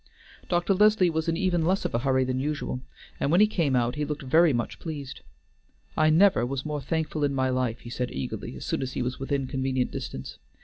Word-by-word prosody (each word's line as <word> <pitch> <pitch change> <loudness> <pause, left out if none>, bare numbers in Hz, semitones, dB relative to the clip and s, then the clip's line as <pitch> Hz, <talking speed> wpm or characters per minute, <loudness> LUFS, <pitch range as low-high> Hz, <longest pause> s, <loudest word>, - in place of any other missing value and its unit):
Dr. 175 +2 +2
Leslie 210 -2 +4
was 160 +1 -2
in 165 0 +1
even 180 -3 +1
less 185 +4 +1
of - - -2
a 115 - +1
hurry 130 0 +2
than 130 0 -1
usual, 140 -2 -3 0.4
and - - 0
when 175 - +5
he 210 - +8
came 165 -10 0
out 120 0 +1
he 150 - 0
looked 150 0 -4
very 160 +5 +4
much 120 -3 -2
pleased. 145 -5 -6 0.7
"I 155 0 +4
never 175 -2 +5
was 135 +3 -3
more 150 -1 -3
thankful 155 +1 -2
in 140 -1 +1
my 130 -1 +1
life," 125 -2 -1
he 120 - -9
said 125 0 -2
eagerly, 65 - -5
as - - -7
soon - - -1
as 130 -1 -4
he - - -1
was 125 +1 -3
within 135 0 -1
convenient 130 -1 -1
distance. - - -6
140 Hz, 225 wpm, -27 LUFS, 130-165 Hz, 0.7 s, he